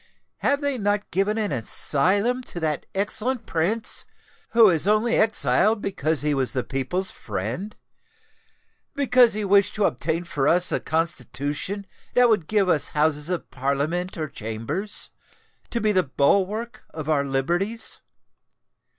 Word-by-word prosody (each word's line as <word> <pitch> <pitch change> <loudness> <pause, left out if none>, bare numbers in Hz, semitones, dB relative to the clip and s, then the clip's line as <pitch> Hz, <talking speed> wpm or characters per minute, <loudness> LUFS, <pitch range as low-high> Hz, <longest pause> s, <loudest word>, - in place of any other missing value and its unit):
"Have 285 +1 +1
they 285 -3 -1
not 205 0 -1
given 195 +4 0
an 210 -5 -1
asylum 190 - +1
to 175 - -5
that 155 -3 -2
excellent 220 +5 0
Prince 195 +8 +1 0.4
who 230 -2 +6
is 170 -1 +3
only 215 +3 +2
exiled 220 0 +3
because 160 -7 -1
he 150 0 +1
was 135 -2 -1
the 130 -2 -1
people's 160 +8 -1
friend—because 210 - -3
he 215 -1 -2
wished 200 0 +3
to 210 - 0
obtain 160 +5 -1
for 145 -5 -1
us 180 +1 +4
a - - 0
Constitution 160 +4 -2 0.3
that 245 -1 +5
would 210 -8 +1
give 205 -3 +1
us 160 -5 +2
Houses 150 +1 0
of 180 -2 -4
Parliament 145 +8 -2
or 155 -1 -3
Chambers, 130 - -4 0.6
to 235 - -1
be 215 -2 +1
the 185 -2 +3
bulwark 200 - 0
of 155 -2 -8
our 150 -3 +2
liberties? 175 +12 0
185 Hz, 140 wpm, -23 LUFS, 150-215 Hz, 0.6 s, who